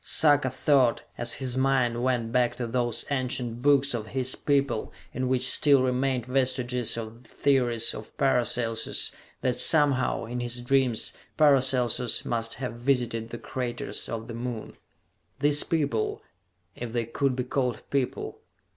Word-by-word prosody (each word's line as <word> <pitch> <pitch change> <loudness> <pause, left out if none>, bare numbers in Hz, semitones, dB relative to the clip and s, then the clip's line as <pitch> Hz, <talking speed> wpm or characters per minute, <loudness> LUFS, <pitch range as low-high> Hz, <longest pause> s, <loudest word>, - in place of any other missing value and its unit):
Sarka 145 -4 +4
thought, 130 -1 +2
as 120 0 0
his 130 -2 -2
mind 130 -3 +1
went 120 -3 0
back 120 -1 +1
to 125 - -3
those 120 -1 -1
ancient 125 -3 -2
books 140 0 +3
of 110 -3 -4
his 130 +2 0
people 140 -6 0 0.2
in 130 0 -2
which 130 0 +2
still 140 -3 +4
remained 130 -1 0
vestiges 125 -2 0
of 115 +1 -7
the 115 - -21
theories 120 -5 +2
of - - -10
Paracelsus, 120 -3 +1 0.3
that 125 -1 0
somehow, 140 -4 +2
in 120 +2 -5
his 120 0 -3
dreams, 125 -2 +1 0.2
Paracelsus 130 -5 +3
must 115 -1 -1
have 125 -3 -5
visited 120 -2 -1
the 120 - -6
craters 125 0 -4
of 115 -1 -4
the 120 - -8
Moon. 115 -1 -6 0.6
These 145 +1 +4
people... 140 -9 -1 0.5
if 120 -2 -6
they 120 -1 -1
could 130 +3 -1
be 125 - -2
called 125 -2 -2
people.... 135 -3 -2
125 Hz, 145 wpm, -27 LUFS, 120-135 Hz, 0.6 s, Sarka